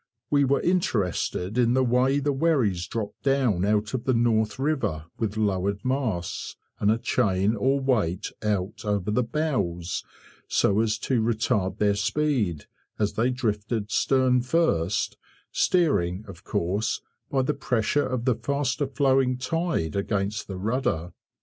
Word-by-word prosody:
We 140 -1 +4
were 140 +1 +2
interested 110 - 0
in 120 0 +3
the 130 - +3
way 125 +3 +3
the 145 0 0
wherries 130 - +1
dropped 110 -3 -5
down 130 -10 +2
out 105 +2 +1
of 125 -3 -3
the 130 - +2
North 110 -2 +2
River, 130 - -1
with 110 -2 -2
lowered 100 -1 0
masts, 125 -10 -2 0.2
and 100 - +2
a 110 - +3
chain 105 -3 +1
or 135 +6 +2
weight 110 -9 0
out 105 -2 -2
over 105 -1 -1
the 125 - +2
bows, 115 - -2 0.4
so 100 +1 +2
as 110 -1 +1
to 125 -4 +1
retard 110 -3 0
their 105 -1 +3
speed, 105 - 0 0.3
as 105 -1 0
they 120 +3 +1
drifted 110 -3 -2
stern 130 -2 +3
first, 105 - +1 0.3
steering, 110 - +1
of 90 -4 -11
course, 95 +6 -1 0.3
by 135 -1 +1
the 150 - 0
pressure 135 0 0
of 125 -2 -2
the 130 - +4
faster 140 +2 -1
flowing 135 -2 +2
tide 130 - -1
against 100 +1 -1
the 95 - -5
rudder. 95 - -1
115 Hz, 145 wpm, -26 LUFS, 100-130 Hz, 0.4 s, We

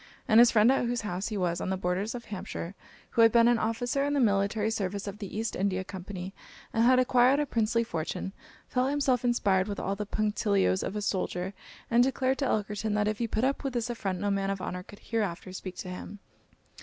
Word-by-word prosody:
And 220 0 +6
his 240 0 +8
friend 220 +2 +5
at 270 - +2
whose 240 0 -1
house 190 -2 -3
he 215 - -3
was, 175 -2 0
on - - -2
the 190 - 0
borders 190 +5 -1
of 235 - -7
Hampshire, 185 -3 -6 0.4
who 230 - +3
had 225 0 +7
been 235 0 +5
an 240 -1 +4
officer 245 +5 0
in 285 0 0
the - - +2
military 210 -1 +2
service 200 -2 -2
of 200 0 -6
the 205 -1 -6
East 225 +1 -2
India 190 -1 0
Company, 190 0 -7 0.4
and 225 - +3
had 255 +2 +6
acquired 255 +2 +4
a 295 - +1
princely 230 -2 +1
fortune, 180 -1 -4 0.3
felt 255 +1 +1
himself 275 -4 +1
inspired 200 -6 +2
with 205 -1 -4
all 195 - -1
the 210 0 -5
punctilios 205 -3 +1
of 195 - -4
a 210 - -2
soldier, 185 -1 -2 0.4
and 235 +1 +5
declared 265 0 0
to 275 - +1
Elkerton 210 0 -1
that 210 0 +1
if 215 -1 -1
he 235 - 0
put 220 +1 -1
up 275 +3 0
with 270 -2 -2
this 240 0 -1
affront 195 -6 -3
no 205 0 0
man 195 0 0
of 195 -1 -2
honour 180 0 -4
could 200 +3 -13
hereafter 195 -5 -3
speak 185 -1 -6
to 180 - -6
him. 180 +3 -7
210 Hz, 230 wpm, -29 LUFS, 195-240 Hz, 0.4 s, his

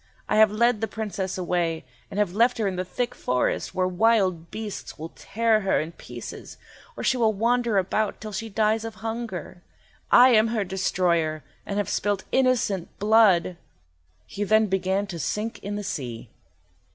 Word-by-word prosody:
I - - +1
have 220 0 +7
led 225 +1 +2
the 225 - 0
Princess 205 -3 -4
away, 170 -4 -1 0.2
and - - -7
have 205 -4 +1
left 235 +4 +3
her 220 -3 0
in 190 - -2
the 180 - -2
thick 245 +6 -3
forest, 125 0 -1
where 185 0 +1
wild 185 -3 +2
beasts 215 -2 -7
will 160 +2 -7
tear 225 0 +1
her 195 -2 +1
in 160 +2 -4
pieces, - - -9 0.4
or - - -5
she 260 - +2
will 225 -2 +3
wander 235 +1 +1
about 200 +3 0
till 215 - -7
she 220 +3 -4
dies 215 +1 +1
of 225 -1 -6
hunger. 225 -6 -5 0.5
I 250 +1 +8
am 220 -2 +5
her 225 -2 -1
destroyer, 175 -4 0 0.2
and 200 - -3
have 205 -3 0
spilt 205 -1 -1
innocent 245 -9 +1
blood!" 205 -5 +4 0.7
He 205 - -4
then 215 +2 +4
began 190 0 0
to 180 -4 -7
sink 210 +9 -3
in 205 +1 -5
the 205 - -4
sea. 125 - -5
205 Hz, 175 wpm, -25 LUFS, 185-225 Hz, 0.7 s, I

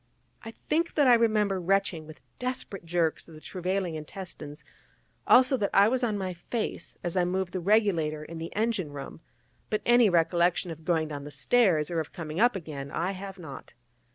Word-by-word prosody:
I 225 - -8 0.2
think 330 +2 0
that 290 - +4
I 250 - +7
remember 215 -5 +2
retching 190 -3 0
with 155 - -12 0.2
desperate 250 -7 -4
jerks 165 -1 0
of 165 - -13
the - - -11
travailing 185 +1 -2
intestines; 155 -2 -8 0.6
also 260 +1 +6
that 205 -4 0
I 200 +1 +7
was 255 +1 0
on 215 -3 +1
my 190 -2 -3
face 215 +6 -5
as 175 0 -3
I 180 - +3
moved 180 0 -1
the 185 - -1
regulator 175 -6 +2
in 165 +1 -8
the 165 - -6
engine 210 -7 0
room: 140 +3 -8 0.5
but 215 0 -1
any 240 -2 +6
recollection 175 +1 +2
of 160 0 -10
going 160 -2 +1
down 145 -2 -6
the 145 - -7
stairs, 155 - +2
or 170 - 0
of 155 - -5
coming 160 -2 -5
up 240 +1 +4
again, 150 -6 -6
I 170 +6 -1
have 195 0 -7
not. 140 -9 -10
180 Hz, 190 wpm, -28 LUFS, 160-210 Hz, 0.6 s, I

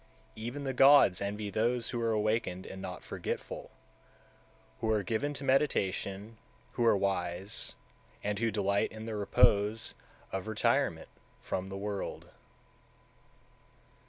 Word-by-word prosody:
181. 110 +1 -6
Even 140 +4 -5
the 135 -1 -2
gods 135 -8 +7
envy 105 +1 -3
those 115 +3 +1
who 120 - -2
are 115 -1 +1
awakened 110 -4 0
and 95 - -8
not 90 -2 -6
forgetful, - - -5 1.1
who 110 - -1
are 105 -2 +2
given 115 +9 -1
to 140 -1 -6
meditation, 110 -6 0 0.3
who 120 - -1
are 115 -3 +5
wise, 95 0 -2 0.5
and 105 0 -1
who 115 0 +2
delight 100 -1 +1
in 110 0 -8
the 115 - -4
repose 105 +1 +3 0.4
of 95 +2 -3
retirement 110 - +1 0.3
(from 95 +1 -3
the 95 - -5
world). 100 0 -4
105 Hz, 130 wpm, -31 LUFS, 100-115 Hz, 1.1 s, gods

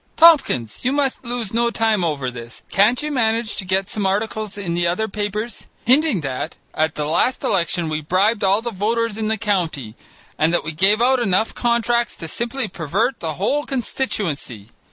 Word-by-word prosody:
Tompkins, 280 - +4
you 255 - +1
must 275 -2 0
lose 235 -4 -3
no 235 +1 +2
time 225 -4 +1
over 140 -6 -1
this. 120 -1 -10
Can't 220 +8 +3
you 300 - -2
manage 225 -3 +1
to - - -3
get 190 +1 0
some 205 -2 -1
articles 215 +1 -2
in 185 -4 -3
the 175 0 +1
other 180 +6 0
papers 210 +2 -4 0.2
hinting 265 - +3
that 135 +3 -4 0.2
at 155 0 0
the 150 - -2
last 170 +11 +1
election 175 -2 0
we 155 0 -2
bribed 195 +8 +1
all 200 +3 +3
the 240 - -3
voters 225 +2 -1
in 220 0 -2
the 220 0 0
county, 170 - -1 0.4
and 155 +1 +3
that 175 - +1
we 160 - -3
gave 195 +8 +3
out 260 +1 +4
enough 220 -1 +1
contracts 235 0 +1
to 165 - -7
simply 235 +6 -2
pervert 195 - -1
the 160 -2 -3
whole 275 - 0
constituency. 190 - -3
210 Hz, 185 wpm, -21 LUFS, 170-235 Hz, 0.4 s, Tompkins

